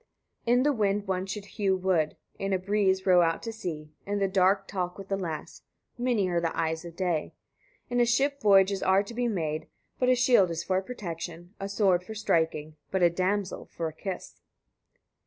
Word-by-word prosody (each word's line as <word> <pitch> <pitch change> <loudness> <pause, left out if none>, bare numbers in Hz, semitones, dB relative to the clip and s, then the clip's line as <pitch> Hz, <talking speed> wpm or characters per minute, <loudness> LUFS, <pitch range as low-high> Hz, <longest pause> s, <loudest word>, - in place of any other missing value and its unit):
82. - - +3
In 250 +1 +4
the 295 0 +3
wind 205 -3 0
one 190 0 -1
should 200 +1 -5
hew 200 -2 0
wood, 180 -5 0 0.2
in 195 0 -1
a - - +3
breeze 190 0 +1
row 180 -2 +6
out 165 -1 +1
to 225 - -4
sea, 155 -8 -6
in 205 +1 -2
the 195 -1 +2
dark 195 +1 +2
talk 180 -2 -3
with 195 0 -10
a - - +3
lass: 165 -6 -5 0.3
many 240 -5 +1
are 175 -1 0
the 165 -1 -2
eyes 160 0 -1
of 170 -1 -9
day. 175 -4 -1 0.5
In 245 0 0
a 240 - +5
ship 280 +4 +1
voyages 195 -2 +5
are 190 +1 +4
to 210 - -9
be 245 +1 0
made, 160 -7 -2 0.3
but 250 - +3
a 255 - +6
shield 240 -7 +4
is 165 0 -3
for 185 0 +1
protection, 175 -5 -7
a 195 0 -4
sword 195 -3 +2
for 220 +4 -8
striking, 160 -6 0
but 190 -1 0
a 170 - +6
damsel 190 +2 -1
for 165 - -4
a 160 - -6
kiss. 190 +2 -7
190 Hz, 205 wpm, -28 LUFS, 175-205 Hz, 0.5 s, row